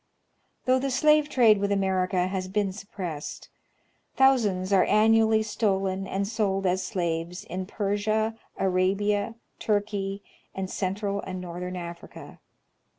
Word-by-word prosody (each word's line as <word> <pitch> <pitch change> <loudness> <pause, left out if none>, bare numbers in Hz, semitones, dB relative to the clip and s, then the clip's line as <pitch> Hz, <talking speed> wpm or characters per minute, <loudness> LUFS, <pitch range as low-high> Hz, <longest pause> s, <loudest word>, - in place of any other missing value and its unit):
Though 255 0 +4
the 275 +1 -1
slave 300 +3 +4
trade 230 -7 +5
with 200 0 0
America 185 -2 +1
has 185 0 -3
been 195 0 -1
suppressed, 180 -6 -7 0.7
thousands 210 -8 +3
are 190 - +6
annually 220 0 +4
stolen 195 -3 -1
and 195 +1 -2
sold 200 -3 -1
as 185 +1 +1
slaves 170 -2 -3
in 185 +1 -5
Persia, 215 +2 0 0.2
Arabia, 200 +3 +1 0.2
Turkey, 205 -2 -1 0.3
and 190 -1 -4
central 200 +1 -2
and 185 -1 -6
northern 180 +1 -6
Africa. 170 -1 -9
195 Hz, 120 wpm, -26 LUFS, 185-215 Hz, 0.7 s, are